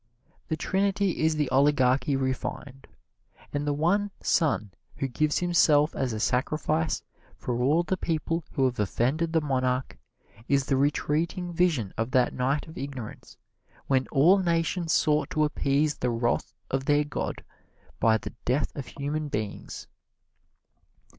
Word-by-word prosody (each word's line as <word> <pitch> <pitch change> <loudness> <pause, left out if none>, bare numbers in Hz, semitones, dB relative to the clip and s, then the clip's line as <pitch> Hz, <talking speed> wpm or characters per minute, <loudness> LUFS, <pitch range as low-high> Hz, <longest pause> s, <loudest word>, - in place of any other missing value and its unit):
The 160 - -2
Trinity 195 +1 0
is 160 0 +2
the 150 -2 0
oligarchy 135 0 +3
refined, 135 +1 -4 0.7
and 145 0 -2
the 145 - +2
one 180 +8 +1
son 140 - +1 0.2
who 135 - -2
gives 150 +4 0
himself 160 -4 +3
as 130 -2 -1
a 110 - -3
sacrifice 155 +6 0 0.3
for 120 -1 -3
all 150 +7 +3
the 190 +2 -1
people 165 0 -1
who 135 -3 +2
have 125 -3 -1
offended 130 - 0
the 160 -1 +2
monarch 130 - -1 0.5
is 140 -1 +2
the 135 - +1
retreating 155 +5 0
vision 160 - +1
of 115 +2 0
that 125 -1 +2
night 135 +5 -1
of 160 - -9
ignorance 135 -5 -7 0.5
when 130 -1 +1
all 165 +8 +5
nations 170 -1 0
sought 150 -2 +2
to 155 - +1
appease 150 0 +1
the 125 - -1
wrath 120 0 0 0.2
of 135 0 -1
their 145 +1 +3
god 145 -2 -4 0.6
by 110 0 +4
the - - -8
death 130 +4 0
of 140 -4 -6
human 150 +2 -3
beings. 105 -6 -5
145 Hz, 145 wpm, -27 LUFS, 130-160 Hz, 0.7 s, all